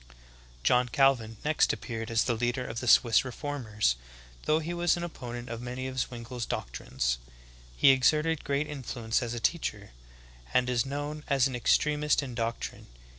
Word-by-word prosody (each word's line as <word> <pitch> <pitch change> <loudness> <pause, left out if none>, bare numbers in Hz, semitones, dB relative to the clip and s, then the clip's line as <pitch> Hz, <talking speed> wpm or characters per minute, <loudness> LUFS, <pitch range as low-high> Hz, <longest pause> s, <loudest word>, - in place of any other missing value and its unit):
10. 60 - -20 0.5
John 125 - +3
Calvin 120 -4 +2
next 155 0 +3
appeared 115 -2 -5
as 115 0 +2
the 120 - 0
leader 120 +2 -1
of 115 -1 -4
the 125 - -5
Swiss 115 -1 +6
reformers, 120 - -1 0.5
though 155 - +3
he 160 +2 -3
was 175 0 +2
an 175 - -4
opponent 120 -7 -6
of 115 0 -5
many 125 +1 -5
of 130 0 -4
Zwingle's 120 -1 -4
doctrines. - - -2 0.6
He 135 - +7
exerted 150 +4 +2
great 140 +1 0
influence 130 -5 -2
as 120 -1 -3
a - - -3
teacher, 110 -7 -1 0.6
and 125 0 +3
is 120 +1 +1
known 145 +2 -4
as 135 -3 +3
an 130 - -5
extremist 150 +5 +2
in 130 -3 -6
doctrine. 115 0 -4
125 Hz, 170 wpm, -29 LUFS, 115-145 Hz, 0.6 s, He